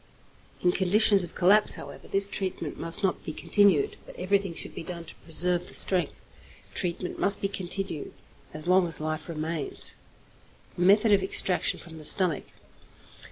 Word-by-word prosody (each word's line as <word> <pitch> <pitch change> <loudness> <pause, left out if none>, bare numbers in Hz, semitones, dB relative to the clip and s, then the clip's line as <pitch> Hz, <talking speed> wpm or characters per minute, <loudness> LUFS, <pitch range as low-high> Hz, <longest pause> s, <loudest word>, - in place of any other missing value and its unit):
In 180 - +2
conditions 195 +2 +3
of 170 - -10
collapse, 205 +4 +3
however, - - -12
this 195 0 +2
treatment 190 -6 -6
must 165 +5 +1
not 190 - -2
be - - -6
continued, 190 -3 +1
but - - -13
everything 195 -1 -2
should - - -6
be - - -8
done 170 0 -9
to - - -12
preserve 175 +2 +2
the - - -2
strength. 180 -5 +3 0.5
Treatment 180 0 -5
must 200 0 +3
be 195 - -2
continued 195 -4 -6 0.4
as 155 +1 -7
long 180 0 +2
as 165 - 0
life 155 +1 -5
remains. 160 -1 +1 0.8
_Method 205 +5 +3
of 200 - +3
Extraction 190 -1 +2
from 160 -2 -12
the 155 - -12
Stomach. 180 -5 +2
180 Hz, 160 wpm, -26 LUFS, 165-195 Hz, 0.8 s, conditions